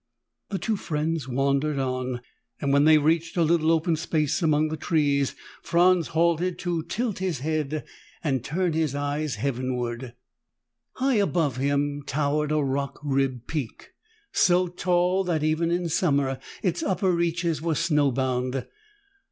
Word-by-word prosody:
The 195 - -2
two 220 +2 -1
friends 155 -3 -2
wandered 140 +3 +1
on, 130 -2 -2 0.4
and 140 -1 0
when 140 +1 +5
they 155 0 +7
reached 165 +3 +1
a 170 - +4
little 160 0 +2
open 165 +1 +2
space 155 +1 0
among 155 -1 +2
the 155 - -2
trees, 145 -3 +1 0.3
Franz 175 -1 +3
halted 170 +2 +1
to 175 -3 -2
tilt 210 +6 -3
his 180 -8 -2
head 155 0 -2 0.4
and 135 -6 0
turn 175 +5 -1
his 155 -3 0
eyes 145 -1 -2
heavenward. 125 0 -3 0.8
High 260 -2 +1
above 165 - +1
him 145 +1 0
towered 145 +2 0
a 155 -1 +2
rock 140 0 -2
ribbed 135 -4 0
peak, 145 -8 -5 0.4
so 180 0 +3
tall 180 +1 +1
that 160 -4 0
even 155 +2 +1
in 175 0 0
summer 140 -6 +1 0.2
its 180 -4 0
upper 190 -1 +1
reaches 170 -2 0
were 165 -1 0
snowbound. 130 -4 0
155 Hz, 145 wpm, -25 LUFS, 140-170 Hz, 0.8 s, they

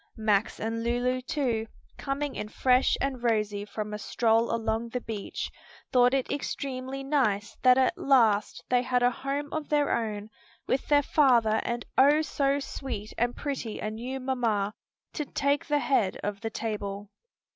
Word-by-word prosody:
Max 215 -2 +1
and 225 +1 -2
Lulu 245 +2 0
too, 245 -5 -1 0.3
coming 280 0 -2
in 210 - -4
fresh 255 +3 +3
and 270 -3 -2
rosy 210 -3 0
from 210 0 -5
a 210 - -4
stroll 225 +1 +2
along 225 0 -1
the 250 - -2
beach, 215 -3 -5 0.4
thought 250 +1 +5
it 265 - -1
extremely 270 -1 -4
nice 250 -8 0
that 255 0 +6
at 260 -1 +2
last 225 -7 +3
they 250 -1 +4
had 250 0 +1
a 245 - +5
home 280 +3 -4
of 310 -1 -3
their 295 -1 +2
own 215 -2 -3 0.3
with 260 - -1
their 290 -1 +4
father 240 -8 +4
and 240 0 -3 0.4
so 275 -1 +1
sweet 245 -6 -6
and 240 +1 0
pretty 270 -6 -4
a 215 - -3
new 250 +5 -5
mamma 230 -6 0 0.4
to 300 - -2
take 285 0 0
the 295 - +2
head 240 -9 +1
of 205 -1 -3
the 225 - -2
table. 205 -2 -4
245 Hz, 160 wpm, -28 LUFS, 220-270 Hz, 0.4 s, that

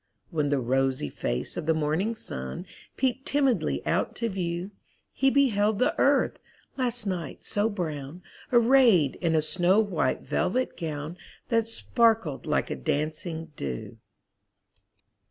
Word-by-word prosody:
When 150 -4 0
the 145 - +2
rosy 130 - 0
face - - -3
of 155 - -4
the 160 - +3
morning 160 +9 0
sun 65 - -6 0.3
Peeped 265 0 0
timidly 260 - +1
out 175 - 0
to 230 - -1
view, 180 -1 -3 0.4
He 270 - +3
beheld 220 -7 +3
the 250 - +2
earth, 280 +1 +3 0.4
last 245 -4 -1
night 175 -7 -4
so 205 +2 +1
brown, 160 -4 -5 0.3
Arrayed 235 - +5
in 165 -2 +2
a 155 - +3
snow 180 +5 +3
white 190 -11 0
velvet 225 +9 0
gown 155 0 -5 0.3
That 230 -2 +2
sparkled 225 - +1
like 65 - -1
dancing 160 - -2
dew. 65 - -5
180 Hz, 130 wpm, -27 LUFS, 150-230 Hz, 0.4 s, Arrayed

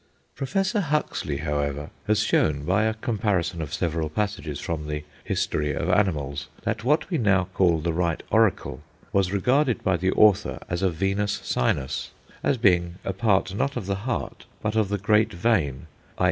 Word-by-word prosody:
Professor 195 - 0
Huxley, 150 - -1
however, 75 -1 -2 0.2
has 105 0 +3
shown, 75 -9 +2
by 100 +6 +2
a 110 0 0
comparison 100 -7 -1
of 75 -3 -5
several 80 -2 -1
passages 100 -5 -3
from 75 -1 -4
the 75 0 -3 0.2
"History 75 -1 -1
of 85 +2 -1
Animals," 75 -8 0 0.2
that 110 - -2
what 150 +6 +2
we 165 - +1
now 95 -5 +2
call 90 -4 +3
the 85 +1 -1
right 85 -1 0
auricle 105 - +2 0.3
was 95 -2 +2
regarded 125 +5 +2
by 95 -2 +2
the 95 +2 +1
author 105 -3 +4
as 85 +1 -2
a 95 - +3
venous 100 +4 0
sinus, 65 +1 -1 0.3
as 135 - +1
being 90 -6 +3
a 95 - -1
part 95 -1 +1
not 135 +6 -1
of 115 - -4
the 100 - -1 0.2
heart, 125 - -3 0.2
but 105 0 -1
of 110 -3 +2
the 105 - 0
great 105 +2 +3
vein 85 - 0 0.3
(_i. - - -16
95 Hz, 175 wpm, -25 LUFS, 80-110 Hz, 0.3 s, author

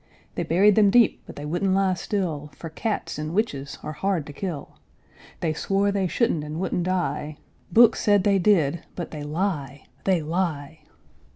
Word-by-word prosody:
They - - -3
buried 200 +5 +4
them 205 0 +5
deep, 235 +2 +4
but - - -10
they 145 - -7
wouldn't 180 +5 0
lie 195 -1 +2
still, 170 -6 -3
For 165 - -8
cats 215 -4 -3
and 155 +3 -4
witches 140 -11 -2
are 155 - -4
hard 185 -1 -1
to 145 - -9
kill; 170 -2 -6 0.6
They 160 -2 0
swore 195 +5 +1
they 195 -2 0
shouldn't 180 -6 0
and 150 +2 -5
wouldn't 180 -1 -1
die, 155 -5 -2 0.3
Books 235 0 +6
said 205 -2 +3
they 200 -1 +3
did, 170 -5 +2
but 175 - -5
they 150 - -6
lie! 145 -4 -3 0.2
they 185 -4 +2
lie! 160 -2 -2
175 Hz, 175 wpm, -24 LUFS, 150-195 Hz, 0.6 s, Books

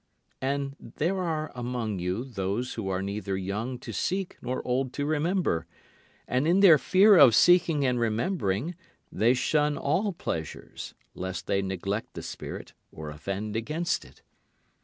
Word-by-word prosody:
And 140 +1 -1 0.2
there 185 +5 0
are 155 -3 -2
among 120 -5 -3
you 90 +6 -2
those 105 0 -3
who 105 -4 -4
are 95 0 -1
neither 100 -1 -3
young 105 +7 -3
to - - -7
seek 190 0 -2
nor 130 - -3
old 130 +1 0
to 145 - -2
remember; 155 - 0 0.6
And 130 +4 +1
in 180 +4 +4
their 170 -7 +8
fear 195 - +6
of 130 -8 +8
seeking 170 -5 +5
and 125 -2 +1
remembering 115 - 0 0.4
they 120 +4 +3
shun 150 +3 +1
all 180 +9 +1
pleasures, 80 - -5 0.2
lest 95 -1 -5
they 100 - +1
neglect 95 +3 -3
the - - -6
spirit - - -7 0.2
or 75 -1 -7
offend 100 +8 -4
against 155 +9 -1
it. - - -18
125 Hz, 150 wpm, -28 LUFS, 100-155 Hz, 0.6 s, their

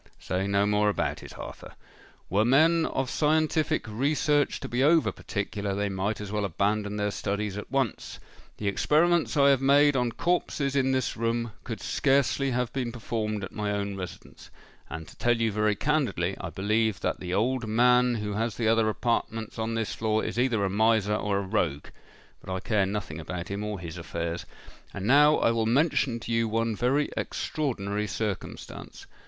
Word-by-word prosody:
"Say 95 +2 -2
no 100 0 +2
more 105 0 +2
about 105 - -1
it, - - -11
Arthur. - - -9 0.5
Were 100 +3 +2
men 160 +7 +4
of 135 0 -2
scientific 155 +2 +1
research 145 +5 +1
to - - -5
be 120 +3 0
over 160 +2 +4
particular, 100 -1 -4
they 100 0 -1
might 100 +2 -2
as 105 -1 -6
well 105 -1 -1
abandon 100 +3 0
their 105 0 0
studies 100 0 -2
at 105 - -7
once. 135 -5 -2 0.4
The 105 - -3
experiments 155 - +2
I 140 0 +6
have 135 -1 +2
made 140 +1 +5
on 125 -2 +1
corpses 155 -5 0
in 135 -1 +2
this 130 -2 0
room, 115 0 -1
could - - -6
scarcely 135 0 +1
have 125 -1 -1
been 125 -3 -2
performed 110 -3 -3
at 95 - -6
my 105 -1 -3
own 100 -1 -2
residence; 90 -3 -9 0.4
and, 80 -1 -7
to - - -14
tell 120 -1 +2
you 115 -1 +1
very 105 0 +1
candidly, 105 - 0
I - - -4
believe 110 +1 0
that - - -1
the 90 0 -3
old 120 +2 0
man 125 +2 +4
who 105 -2 -3
has 115 +2 -1
the 115 - 0
other 115 -1 +3
apartments 115 0 -2
on 110 +1 -1
this 115 -2 -2
floor, 110 -1 0
is - - -3
either 120 -5 +2
a - - 0
miser 110 0 +2
or 105 -1 0
a - - 0
rogue;—but 85 0 -5
I 95 - -2
care 100 0 +1
nothing 95 -5 -4
about 85 +2 -5
him 100 +1 -3
or 105 -2 -4
his 85 0 -7
affairs. 85 0 -4 0.5
And 95 - -4
now 145 +5 +6
I - - +3
will 115 -1 0
mention 130 -2 +2
to 115 - -6
you 115 0 +2
one 115 0 0
very 135 +6 +1
extraordinary 105 -9 -2
circumstance. 105 -3 -5
110 Hz, 180 wpm, -27 LUFS, 100-130 Hz, 0.5 s, I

